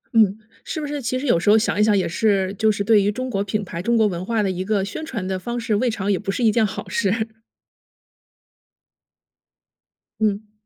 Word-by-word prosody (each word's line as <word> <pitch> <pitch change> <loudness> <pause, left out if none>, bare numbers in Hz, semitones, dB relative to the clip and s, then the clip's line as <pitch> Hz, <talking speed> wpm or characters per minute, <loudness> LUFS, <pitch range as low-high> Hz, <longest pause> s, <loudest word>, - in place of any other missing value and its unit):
嗯， 215 -2 +4 0.3
是 315 - -4
不 300 - -3
是 290 0 -4
其 255 +1 -1
实 270 - -4
有 235 -11 +3
时 175 - +1
候 215 - +7
想 215 -1 0
一 - - +5
想 210 -2 +4
也 185 - +1
是 195 +1 +1
就 220 +2 +2
是 205 -1 -2
对 215 0 +5
于 205 +1 +1
中 255 +4 -4
国 200 -1 0
品 210 +1 -2
牌、 170 -2 -6
中 235 +3 +1
国 220 - +4
文 180 -3 -2
化 225 +1 0
的 195 - 0
一 185 0 -3
个 195 -1 0
宣 205 - -6
传 225 - -4
的 190 -1 -2
方 240 +6 -4
式， 225 -2 -1
未 245 +4 +1
尝 205 -2 -1
也 190 - +1
不 200 -1 -3
是 240 - -2
一 225 - +5
件 225 +1 +2
好 200 - -5
事。 220 +2 0 2.9
嗯。 210 0 -1
210 Hz, 250 characters per minute, -22 LUFS, 195-230 Hz, 2.9 s, 候